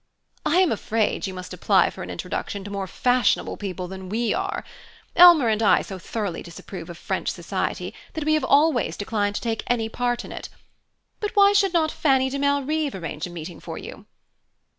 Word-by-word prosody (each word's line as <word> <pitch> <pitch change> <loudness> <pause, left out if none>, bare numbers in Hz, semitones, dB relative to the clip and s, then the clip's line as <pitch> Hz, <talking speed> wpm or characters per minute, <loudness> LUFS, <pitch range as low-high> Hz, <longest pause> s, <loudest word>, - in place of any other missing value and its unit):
"I 355 +4 +4
am 370 - +3
afraid 220 -1 0
you 190 - -6
must 185 0 -7
apply - - +3
for - - -10
an - - -6
introduction 200 -1 -4
to 205 - -8
more 200 -1 -3
fashionable 250 +5 +1
people 185 -3 -5
than 190 0 -8
we 225 +2 0
are. 390 +1 -2 0.5
Elmer 345 -7 +8
and 220 0 +1
I 210 - +4
so 190 -1 -7
thoroughly 200 -1 -4
disapprove 170 0 -9
of 170 - -8
French - - -2
society - - -3 0.2
that 315 - -3
we 310 - +3
have 310 -3 +2
always 275 - +3
declined 205 0 -1
to - - -2
take 225 -2 -2
any 230 -2 0
part 245 +1 -1
in - - -10
it. - - -7 0.7
But 420 +1 -3
why 400 0 +6
should 395 -2 +3
not 320 -2 +2
Fanny 265 -3 +2
de 280 - -2
Malrive 285 0 0
arrange 165 -3 -5
a - - -10
meeting 170 -1 -8
for - - -7
you?" - - -10
230 Hz, 195 wpm, -24 LUFS, 190-300 Hz, 0.7 s, Elmer